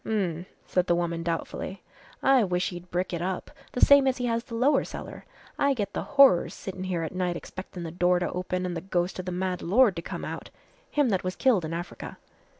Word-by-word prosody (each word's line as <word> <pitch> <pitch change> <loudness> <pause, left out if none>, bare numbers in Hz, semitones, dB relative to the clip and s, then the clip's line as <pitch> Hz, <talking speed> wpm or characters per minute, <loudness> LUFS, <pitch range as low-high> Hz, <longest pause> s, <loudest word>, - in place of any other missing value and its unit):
"H'm," 185 -5 -1 0.2
said 180 0 0
the 175 - +3
woman 170 -1 -1
doubtfully, 170 +2 -4 0.4
"I 270 -3 +5
wish 180 -2 0
he'd 175 0 -9
brick 180 +1 -2
it 170 - -2
up 185 +1 -3 0.2
the 250 - -3
same 280 -1 +7
as 260 - +2
he 245 - -2
has 230 -1 0
the 240 -3 -8
lower 260 +6 +3
cellar - - -8 0.3
I 280 -1 +3
get 205 -4 -3
the - - -2 0.2
horrors 270 -11 +6
sittin' 190 -1 -6
here 175 -3 -1
at 160 - -4
night 180 -2 -1
expectin' 185 -1 -8
the 165 - -5
door 180 +1 +3
to 175 - -1
open 185 0 -2
an' 180 - -2
the 165 - -4
ghost 180 0 -1
of 185 - -4
the 180 - -3
mad 180 0 -2
lord 210 +2 +4
to - - -2
come - - -6
out - - -6 0.4
him 290 -4 +2
that 190 -4 0
was 185 0 -3
killed 225 -11 +3
in 155 - -5
Africa." 175 +1 -7
185 Hz, 230 wpm, -27 LUFS, 175-220 Hz, 0.4 s, same